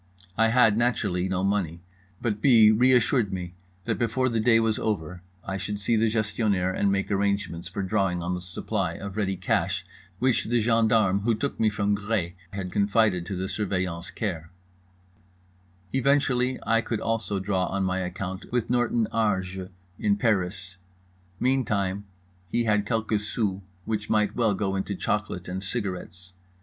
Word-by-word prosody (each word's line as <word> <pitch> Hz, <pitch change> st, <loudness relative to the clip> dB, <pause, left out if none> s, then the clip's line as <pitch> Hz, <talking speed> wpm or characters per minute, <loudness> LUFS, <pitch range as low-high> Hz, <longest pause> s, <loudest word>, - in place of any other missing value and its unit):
I 115 Hz, +1 st, +4 dB
had, 115 Hz, -2 st, +4 dB
naturally, 100 Hz, -7 st, 0 dB
no 95 Hz, 0 st, 0 dB
money; 90 Hz, -4 st, -1 dB, 0.4 s
but 105 Hz, -3 st, -1 dB
B. 115 Hz, -5 st, +7 dB
reassured 125 Hz, -1 st, +3 dB
me 90 Hz, -2 st, -5 dB, 0.3 s
that 115 Hz, -4 st, -1 dB
before 130 Hz, +2 st, +1 dB
the 115 Hz, -1 st, 0 dB
day 115 Hz, +1 st, +5 dB
was 110 Hz, -1 st, +1 dB
over 90 Hz, -4 st, -2 dB, 0.2 s
I 95 Hz, 0 st, -3 dB
should 100 Hz, +2 st, -4 dB
see 105 Hz, +3 st, +1 dB
the 110 Hz, 0 st, +3 dB
Gestionnaire 105 Hz, -4 st, 0 dB
and 100 Hz, +1 st, +1 dB
make 100 Hz, +1 st, -1 dB
arrangements 100 Hz, -4 st, -1 dB
for 95 Hz, +2 st, -4 dB
drawing 95 Hz, -3 st, 0 dB
on 90 Hz, +1 st, -1 dB
the 90 Hz, -, -3 dB
supply 90 Hz, 0 st, -2 dB
of 100 Hz, +2 st, -7 dB
ready 95 Hz, -3 st, -1 dB
cash -, -, 0 dB, 0.3 s
which 130 Hz, +2 st, +1 dB
the 120 Hz, +1 st, +2 dB
gendarmes 110 Hz, -3 st, +3 dB
who 115 Hz, 0 st, +2 dB
took 140 Hz, +6 st, -3 dB
me 110 Hz, -, +4 dB
from 105 Hz, -1 st, 0 dB
Gré 100 Hz, -4 st, -2 dB, 0.2 s
had 95 Hz, -2 st, -5 dB
confided 100 Hz, -2 st, +2 dB
to 100 Hz, -, -3 dB
The 95 Hz, +1 st, -2 dB
Surveillant's 90 Hz, -3 st, -2 dB
care; 85 Hz, -7 st, -4 dB, 1.4 s
eventually 130 Hz, -2 st, +2 dB
I 115 Hz, 0 st, +3 dB
could 115 Hz, -1 st, -3 dB
also 115 Hz, -3 st, -1 dB
draw 95 Hz, -1 st, 0 dB
on 100 Hz, 0 st, -1 dB
my 95 Hz, 0 st, 0 dB
account 95 Hz, +1 st, -5 dB
with 120 Hz, -1 st, 0 dB
Norton 120 Hz, -2 st, +2 dB
Harjes 95 Hz, -4 st, -1 dB, 0.3 s
in 100 Hz, -1 st, +2 dB
Paris; 95 Hz, -4 st, -1 dB, 0.6 s
meantime 105 Hz, -7 st, 0 dB, 0.4 s
he 120 Hz, -, +1 dB
had 105 Hz, -2 st, +1 dB
quelques 110 Hz, -2 st, 0 dB
sous 100 Hz, -5 st, -1 dB, 0.2 s
which 105 Hz, -1 st, -3 dB
might 105 Hz, -1 st, +2 dB
well 110 Hz, -4 st, +2 dB
go 95 Hz, -1 st, -1 dB
into 95 Hz, +1 st, -2 dB
chocolate 105 Hz, -2 st, -2 dB
and 95 Hz, +1 st, -4 dB
cigarettes. 95 Hz, -3 st, -5 dB
100 Hz, 160 wpm, -26 LUFS, 95-115 Hz, 1.4 s, B